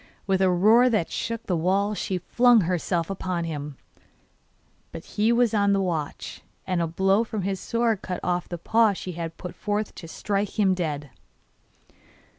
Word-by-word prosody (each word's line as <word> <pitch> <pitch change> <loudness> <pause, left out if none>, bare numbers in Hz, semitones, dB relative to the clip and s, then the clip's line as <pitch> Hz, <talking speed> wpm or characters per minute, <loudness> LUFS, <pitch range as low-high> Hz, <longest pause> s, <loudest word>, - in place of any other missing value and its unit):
With 190 -1 +1
a 190 - +4
roar 215 +8 +5
that 215 -8 0
shook 230 0 -3
the 180 - 0
walls 195 +5 +1
she 190 - -2
flung 240 +5 +4
herself 175 0 -1
upon 185 -2 -3
him; 150 -4 -5 1.1
but - - -9
he 215 +2 +1
was 235 -1 +3
on 200 -1 +3
the 195 - +2
watch, 165 -6 -3 0.2
and 185 -2 0
a 165 - 0
blow 195 +6 +2
from 215 -3 -4
his 195 0 -2
sword 230 -2 0
cut 180 -1 -4
off 180 0 -1
the 175 - -4
paw 220 +5 +3
she 185 -1 -6
had 165 -1 -6
put 180 -2 -7
forth 210 0 -2
to 165 - -10
strike 200 +5 -3
him 195 -2 +4
dead. 150 -6 -3
190 Hz, 175 wpm, -25 LUFS, 175-210 Hz, 1.1 s, roar